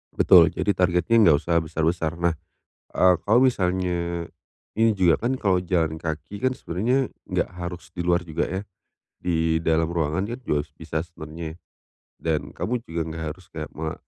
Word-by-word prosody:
Betul. 85 -1 +7
Jadi 105 - 0
targetnya 90 +4 +2
nggak 75 - +6
usah 85 +2 -1
besar-besar. 80 +1 -1
Nah, 85 -1 +1 0.6
eee, 90 0 +5
kalau 110 +4 +4
misalnya 90 -5 -1 0.5
ini 115 +1 +4
juga 90 -5 +4
kan 130 +2 0
kalau 95 -5 +2
jalan 85 -3 0
kaki 80 +5 -5
kan 130 - +2
sebenarnya 125 +6 0 0.2
nggak - - 0
harus 90 0 -6
di 90 - -3
luar 85 0 +1
juga 80 -2 -1
ya. 95 +2 -2 0.6
Di 80 -2 +1
dalam 80 0 +2
ruangan 85 +2 -1
kan 120 +3 -5
juga 75 -3 -1
bisa 80 -1 -4
sebenarnya 80 -1 -8 0.6
dan 80 -2 -1
kamu 120 0 -3
juga 80 -4 -4
nggak 80 0 -5
harus 90 +3 -11
kayak 75 -1 -6
me 80 0 -3
85 Hz, 160 wpm, -24 LUFS, 80-95 Hz, 0.6 s, Betul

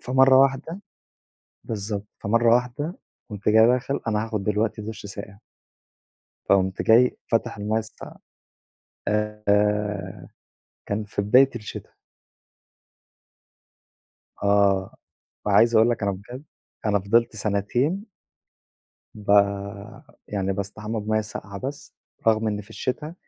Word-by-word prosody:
فمرّة 130 +1 +5
واحدة 135 +7 +1 0.8
بالضبط، 105 -1 -4
فمرّة 115 +2 +3
واحدة 125 +8 -2 0.3
قُمت 105 0 -3
جاي 110 +1 +6
داخل 125 +3 +1
أنا 110 0 0
هاخد 105 -3 -3
دلوقتي 105 +1 0
دُش 110 -1 -7
ساقع. 100 0 -9 1.1
فقُمت 95 -1 +2
جاي 120 +3 +5
فاتح 115 0 0
المَيَّة 105 +2 -1
الساقعة 110 0 -9 0.9
آآ، 105 -1 0 0.6
كان 105 +1 -2
في 105 0 -3
بداية 130 +6 +5
الشتا. 105 - -8 2.5
آه، 100 -2 +2 0.5
وعايز 115 +3 +4
أقول 115 +2 +5
لك 115 - -2
أنا 100 0 +1
بجد 120 +9 -9 0.4
أنا 105 -1 +2
فضلت 115 +3 +2
سنتين 120 - -1 1.1
ب 105 -1 -6 1.0
يعني 95 -2 -1
باستحمى 105 +3 -4
بمَيَّة 110 +1 0
ساقعة 100 -2 -7
بس، 140 +2 -7 0.3
رغم 110 0 +3
إن 105 0 -2
في 100 - -16
الشتا 150 +5 -4
105 Hz, 110 wpm, -24 LUFS, 100-120 Hz, 2.5 s, جاي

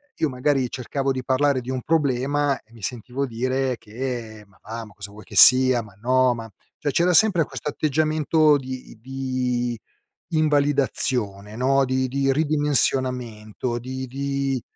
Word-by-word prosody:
io 160 - 0
magari 130 0 0
cercavo 135 +2 -2
di 130 -1 -3
parlare 135 0 +1
di 125 - -9
un 130 -1 -3
problema, 145 -2 +1
e 110 - -32
mi 115 - -15
sentivo 125 +5 -4
dire 130 +2 -1
che: 115 -1 -6
"Ma 100 - -26
va, 115 +1 -6
ma 105 - -16
cosa 100 -1 -8
vuoi 105 +1 -13
che - - -13
sia 130 -2 +7
ma 105 -2 -15
no, 130 +1 +3
ma" 115 -2 -8 0.3
cioè 145 - -1
c'era 180 +4 +2
sempre 190 -3 +5
questo 150 - -5
atteggiamento 155 0 +2
di 130 -3 -8
di 125 -2 -2 0.5
invalidazione, 135 -9 +1
no, 135 +2 +2
di 130 0 0
di 135 +1 0
ridimensionamento, 130 -6 0
di 130 +2 -5
di 140 0 -2
130 Hz, 150 wpm, -23 LUFS, 120-140 Hz, 0.5 s, sia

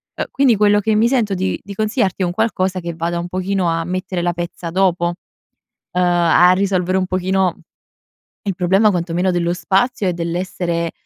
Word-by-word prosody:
Uhm, - - -2
quindi 270 -4 +3
quello 205 0 +4
che 220 +2 +1
mi 220 +2 +4
sento 235 -5 +1
di 190 +1 -1
di 200 - -8
consigliarti, 210 -3 0
è - - +2
un 175 - -1
qualcosa 190 -3 0
che 170 0 -5
vada 170 +1 -2
un 170 - -4
pochino 185 0 -1
a 165 0 -1
mettere 185 0 -3
la 175 0 0
pezza 175 0 -5
dopo, 180 -1 +1
uhm, 175 +1 -9 0.6
a 175 0 +4
risolvere 185 -1 +1
un 185 - -1
pochino 185 -1 0 0.9
il 195 -3 -2
problema, 190 +4 +3
quanto 170 -2 -2
meno 180 +2 +1
dello 175 -1 0
spazio, 195 +6 0
e 180 - +1
dell'essere, 170 0 -2
185 Hz, 185 wpm, -18 LUFS, 175-195 Hz, 0.9 s, quello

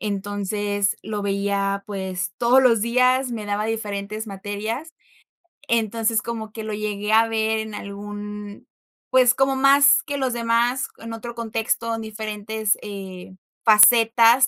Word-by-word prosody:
Entonces, 205 0 -2
lo 210 -1 -4
veía, 200 0 -1
pues, 190 -2 -4
todos 250 +2 +4
los 230 -4 +4
días, 255 +2 +2
me 215 -3 -5
daba 205 +1 -1
diferentes 215 -1 -4
materias. 215 +9 -5 0.7
Entonces, 225 0 +1
como 225 -2 -6
que 220 0 -7
lo 215 0 -5
llegué 210 0 -3
a 225 +1 +5
ver 220 0 0
en 220 0 -6
algún, 205 0 -8 0.4
pues, 255 -1 +5
como 270 0 +1
más 280 +2 +5
que 285 -3 -4
los 260 -3 -1
demás, 235 +2 0
en 230 0 -8
otro 235 +1 -7
contexto, 230 0 -2
en 225 - -6
diferentes, 215 -1 -2
eh, 190 -3 -9 0.3
facetas 230 +3 +6
220 Hz, 135 wpm, -22 LUFS, 205-235 Hz, 0.7 s, facetas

